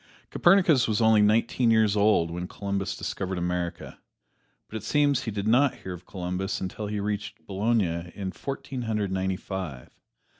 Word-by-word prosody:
Copernicus 175 -8 +4
was 110 -2 +1
only 110 -2 +5
nineteen 115 +3 +3
years 110 -2 +4
old 100 -5 +3
when 90 +1 -4
Columbus 100 0 -3
discovered 95 0 -3
America, 90 0 -3 0.7
but - - -10
it - - -7
seems 145 +3 +2
he - - -2
did 100 -1 -3
not 130 +4 +4
hear 95 - -7
of 90 0 -11
Columbus 90 +1 -3
until 95 +3 -4
he 105 0 -3
reached 105 0 -4
Bologna 95 -5 0
in 95 -2 -4
Fourteen 135 - -5
Hundred 105 -4 -1
Ninety 95 0 -1
five. 90 -12 -6
100 Hz, 160 wpm, -26 LUFS, 95-110 Hz, 0.7 s, only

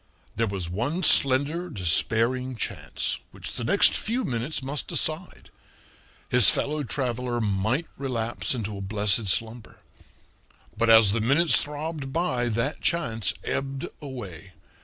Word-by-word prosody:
There 115 +2 0
was 95 -4 -4
one 125 - -3
slender, 145 +6 +3
despairing 120 - 0
chance, 110 - -2
which - - -8
the - - -3
next - - +4
few 240 +4 -2
minutes 130 +2 -3
must 135 0 -2
decide. - - -1 0.8
His - - +6
fellow 150 +1 0
traveler 125 -2 -2
might 110 - 0
relapse 120 -2 -2
into 105 -3 -4
a - - -6
blessed 105 +1 +2
slumber. 110 +4 -1 1.0
But 115 - +1
as 110 -3 +7
the 115 +2 0
minutes 140 +5 +4
throbbed 150 -1 -5
by 135 -7 -1
that 115 +6 -2
chance 115 - 0
ebbed 135 0 -3
away. 100 - -9
120 Hz, 130 wpm, -25 LUFS, 110-145 Hz, 1.0 s, as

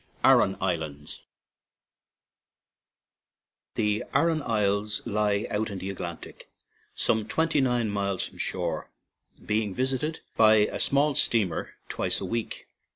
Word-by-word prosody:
ARAN 95 - +5
ISLANDS 80 -6 -3 2.5
THE 105 -1 +1
Aran 165 -2 +3
Isles 105 -3 0
lie 105 -2 +1
out 110 +1 -1
in 100 - -5
the 95 +1 -4
Atlantic, 85 -3 -8 0.5
some 110 -1 +1
twenty 160 +2 +1
nine 125 -3 +1
miles 100 -2 -1
from - - -16
shore, 85 -4 -2 0.6
being 105 -2 0
visited 135 +5 -1
by 110 -1 +6
a 105 -1 +2
small 145 +2 +2
steamer 105 -11 0
twice - - -1
a - - -4
week. 115 -1 -4
105 Hz, 115 wpm, -27 LUFS, 95-120 Hz, 2.5 s, by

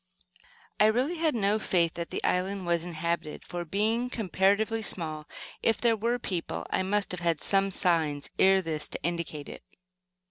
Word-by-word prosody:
I 210 - +7
really 255 +10 +1
had 315 -4 +1
no 210 0 +2
faith 170 -5 +2
that 170 -1 -5
the - - -4
island 190 +1 0
was 170 -1 +1
inhabited, 170 -2 -3
for, 175 0 -4
being 220 +8 0
comparatively 215 0 +1
small, 155 -7 -1 0.3
if 225 - +2
there 235 -1 +3
were 230 +3 0
people 170 - -4
there - - +1
I - - +2
must 200 +1 0
have 180 -1 -4
met 165 -3 +1
some 195 0 +2
signs, 160 -6 0
ere 190 0 +5
this, 155 -2 0
to - - -7
indicate 165 -3 -3
it. - - -9
190 Hz, 175 wpm, -28 LUFS, 170-215 Hz, 0.3 s, I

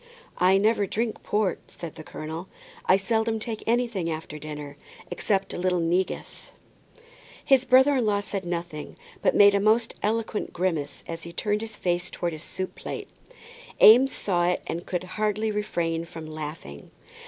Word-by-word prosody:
"I 185 +2 +5
never 205 0 +2
drink 225 +3 -2
port," 210 -2 0
said 170 -3 -8
the 155 - -10
colonel. 160 +4 -6 0.4
"I 185 - +6
seldom 220 +3 0
take 220 0 -5
anything 230 -7 +1
after 155 -1 -5
dinner, 150 -1 -7 0.4
except 195 -3 0
a - - -4
little 180 0 +1
negus." 175 +3 -2 0.9
His 265 -2 +4
brother 265 +3 +6
in 245 - +1
law 205 -1 +2
said 200 -1 -4
nothing, 170 -3 -5 0.3
but - - +2
made 205 0 +7
a 200 - +3
most 220 +3 +3
eloquent 220 0 -1
grimace 160 -6 -2
as 165 0 -5
he 170 - -7
turned 210 +4 -1
his 225 -1 -6
face 175 0 -1
towards 170 -1 -3
his 155 - -7
soup 185 +1 -5
plate. - - -6 0.7
Eames 250 +5 +8
saw 175 -3 +1
it, 180 - 0
and 170 +2 -5
could 180 -1 -2
hardly 215 +3 -1
refrain 170 -6 -1
from 165 -1 -9
laughing. 150 - -7
185 Hz, 165 wpm, -26 LUFS, 165-215 Hz, 0.9 s, Eames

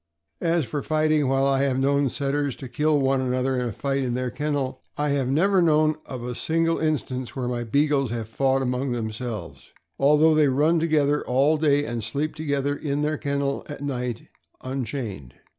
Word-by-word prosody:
As 165 -3 +1
for 145 +4 -3
fighting, 155 -1 +1
while 135 +1 +2
I 135 -1 +2
have 135 -2 +1
known 140 +1 +2
Setters 140 0 -1
to 135 - -8
kill 150 +4 +1
one 135 -1 +2
another 130 +1 0
in 125 - -1
a - - -3
fight 140 +5 -1
in 125 -2 -1
their 125 -1 -2
kennel, 145 -3 -2 0.2
I 150 0 0
have 140 -2 0
never 185 +8 +3
known 155 -2 +4
of 125 -3 -6
a 125 0 -4
single 165 +5 0
instance 130 -5 -2
where 130 -2 -2
my 120 -1 -2
Beagles 140 +2 +1
have 115 -2 -4
fought 135 +3 +1
among 125 +1 -1
them 110 -2 -3
selves, 115 0 -7 0.3
although 150 +3 +5
they 155 -1 +4
run 150 +5 +3
together 150 -3 +2
all 135 +5 +3
day 145 -2 +2
and 115 -3 -3
sleep 140 +8 -1
to 155 - -5
gether 140 0 0
in 145 0 -2
their 150 0 -1
kennel 140 -1 -1
at 145 - -7
night 125 -4 -3 0.4
unchained. 115 - -5
140 Hz, 195 wpm, -24 LUFS, 125-150 Hz, 0.4 s, although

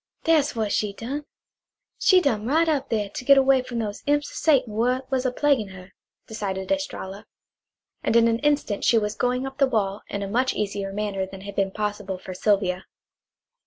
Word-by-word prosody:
"Dat's 315 -3 +3
w'at 220 -3 -1
she 210 -1 0
done. 270 +8 -5 0.7
She 370 -1 +5
dumb 225 -8 0
right 320 +5 +3
up 285 -5 0
here, 210 -3 0
to 225 - -6
git 275 +2 +6
away 270 -1 +5
frum 250 -1 -6
those 210 -2 -4
imps 290 0 +1
o' - - -13
Satan 260 -8 +2
w'at 250 +4 +1
was 260 -1 +1
a - - 0
plaguein' 250 -8 +1
her," 185 0 -12 0.3
decided 195 -4 -4
Estralla, 215 -9 -3 0.7
and - - 0
in 230 0 +6
an 230 0 +1
instant 290 -8 0
she 235 - +4
was 210 -1 0
going 250 +2 0
up 270 +1 -8
the 275 - +5
wall 210 -4 -1
in 200 0 -4
a - - -3
much 250 +6 +1
easier 200 -1 -2
manner 195 -2 -2
than 190 0 -10
had 200 +1 -8
been 195 -1 +1
possible 205 -1 -3
for 185 0 -8
Sylvia. 190 -1 +1
225 Hz, 200 wpm, -24 LUFS, 200-270 Hz, 0.7 s, git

